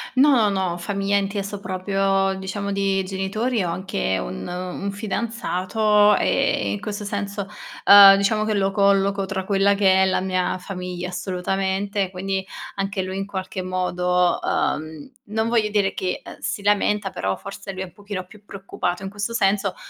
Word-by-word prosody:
No, 260 -6 +5
no. 190 -3 -1
Famiglia 200 +3 -1
inteso 200 0 -2
proprio, 195 0 0
diciamo 200 +1 -4
di 195 -1 +1
genitori. 200 +4 -1
Ho 175 - -2
anche 170 - -2
un - - -5
un 180 +2 -4
fidanzato 210 -1 +1
ehm, 100 -1 +1
in 100 - -5
questo 205 0 -5
senso, 200 -1 -4 0.4
uhm, 200 -1 +10
diciamo 215 +2 +1
che 215 - 0
lo 195 -1 +1
colloco 200 0 +2
tra 190 -1 -4
quella 200 0 +3
che 190 -1 +4
è - - +4
la 190 - +1
mia 185 -1 -1
famiglia, 180 -1 -6
assolutamente. 190 +2 -2
Quindi, 190 +1 -3 0.3
anche 195 0 -2
lui 185 0 -5
in 195 - -2
qualche 190 -1 -5
modo 180 -1 +1
uhm, 155 - -2 0.2
non 220 +1 0
voglio 230 -2 +2
dire 205 -2 +1
che, 185 -1 -3
ehm, - - -10
si 205 - -3
lamenta, 205 0 +1
però 95 - -2
forse 200 0 -8
lui 190 -1 -6
è - - -2
un 180 - -15
pochino 200 -2 -6
più 210 +2 -17
preoccupato 195 -2 -4
in 195 - -4
questo 205 +3 -4
senso. 200 -3 +2
Ha 180 - -12
195 Hz, 170 wpm, -22 LUFS, 185-205 Hz, 0.4 s, uhm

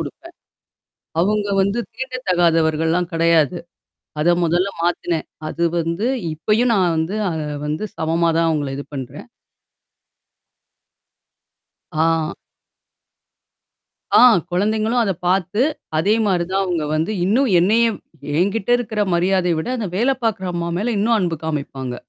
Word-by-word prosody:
குடுப்பேன். 335 +1 -8 0.9
அவுங்க 205 +3 +1
வந்து 200 +4 0 0.2
தீண்ட 255 +2 -6
தகாதவர்கள்லாம் 165 -1 +2
கிடையாது. 165 0 +3 0.6
அத 175 +3 +4
மொதல்ல 175 +4 +1
மாத்தினேன். 170 -1 -1 0.2
அது 170 +2 -2
வந்து 170 +6 -1 0.3
இப்பயும் 220 +9 +1
நான் 180 -5 +2
வந்து 160 +6 -1
அத 160 - -3 0.3
வந்து 155 +7 -2
சமமா 165 +1 +1
தான் 165 0 +3
அவுங்கள 145 -3 -1
இது 140 - -6
பண்றேன். 130 -3 -7 2.7
ஆ. 160 0 +1 1.9
ஆ - - +7 0.3
குழந்தைங்களும் 215 +6 +1
அத 200 -4 +1
பாத்து, 190 +4 +1 0.4
அதே 200 +7 +3
மாரி 180 -4 +1
தான் 195 +1 +1
அவுங்க 175 -4 -1
வந்து 160 +5 0
இன்னும் 235 +7 +2
என்னையும் 225 +3 +2 0.4
என்கிட்ட 200 +4 0
இருக்கிற 220 -3 -3
மரியாதைய 180 -1 +1
விட, 160 - -3
அந்த 215 -4 -3
வேல 240 +7 +2
பாக்குற 200 -4 -1
அம்மா 170 0 -2
மேல 230 +4 -1
இன்னும் 225 +3 +2
அன்பு 170 -4 -1
காமிப்பாங்க. 135 -5 -4
175 Hz, 120 wpm, -20 LUFS, 165-210 Hz, 2.7 s, ஆ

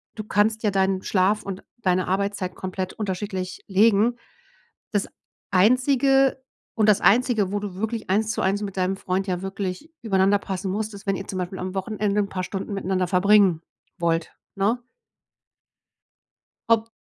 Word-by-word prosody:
du 215 - -5
kannst 215 +1 +1
ja 210 - +3
deinen 190 -1 +1
Schlaf 195 +2 +2
und 195 -1 -6 0.2
deine 185 -3 +1
Arbeitszeit 195 -1 -1
komplett 185 0 -4
unterschiedlich 190 -2 -4
legen. 215 +4 +3 0.7
Das 205 -2 0 0.4
Einzige 260 +6 +3 0.3
und 215 -2 +2
das 205 - +4
Einzige, 225 -3 +3
wo 205 - -1
du 200 -3 -5
wirklich 220 +1 -4
eins 215 +2 +2
zu - - -2
eins 195 +2 +1
mit 195 -1 -6
deinem 185 +1 +1
Freund 190 +1 -1
ja 180 -1 -2
wirklich 195 - -5
übereinander 195 -2 +3
passen 190 -1 -4
musst, 215 +1 -3
ist 200 0 -11
wenn 195 - +2
ihr 195 - -7
zum 185 - -4
Beispiel 185 +1 -4
am 185 +1 -4
Wochenende 210 +1 0
'n 200 - -3
paar 185 -1 -3
Stunden 195 +2 -5
miteinander 185 -2 -1
verbringen 190 -2 +4 0.4
wollt, 165 -1 0 0.2
ne? 225 +5 0 1.9
Ob 225 0 +3
195 Hz, 160 wpm, -24 LUFS, 185-215 Hz, 1.9 s, das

